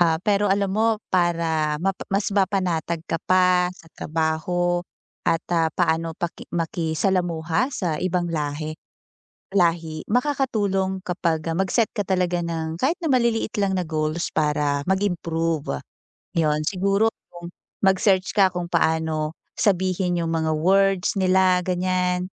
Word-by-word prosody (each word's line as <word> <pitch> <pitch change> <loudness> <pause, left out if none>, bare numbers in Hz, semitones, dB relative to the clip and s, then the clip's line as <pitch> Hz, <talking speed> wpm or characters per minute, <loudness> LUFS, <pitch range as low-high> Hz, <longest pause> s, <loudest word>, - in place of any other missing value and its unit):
Ah, 165 -2 +4
pero 205 -1 +2
alam 195 0 +1
mo 220 +1 +2 0.2
para 165 -4 +1
mapa 190 +4 -3
mas 195 +1 0
mapanatag 180 -4 0
ka 165 - -3
pa 180 -1 +4
sa 165 - -17
trabaho 165 +3 -1 0.5
at, 165 0 +1
ah, 165 -1 +3
paano 165 -1 0
paki 175 -1 -5
makisalamuha 170 - 0
sa 175 - -2
ibang 180 -2 -1
lahe 155 0 -3 0.8
lahi, 165 -3 +1
makakatulong 210 -7 0
kapag, 170 -4 -1
ah, 165 - -1
mag-set 195 +4 +1
ka 205 - 0
talaga 180 -2 0
ng 160 -1 -3
kahit 270 - +1
na 330 - -1
maliliit 235 -5 +1
lang 200 -2 +1
na 175 - -5
goals 155 +1 -1
para 150 -2 +1
mag-improve. 165 - -1 0.5
'Yun, 155 -2 +1
siguro 200 +4 +1 0.2
kung 175 0 -10 0.3
mag-search 190 0 +3
ka 195 -3 +5
kung 175 -1 -4
paano 160 -2 0 0.2
sabihin 185 -2 +1
yung 165 - -2
mga 160 -1 0
words 195 +2 +3
nila 185 -1 +4
ganyan. 180 0 -1
175 Hz, 130 wpm, -23 LUFS, 160-190 Hz, 0.8 s, ka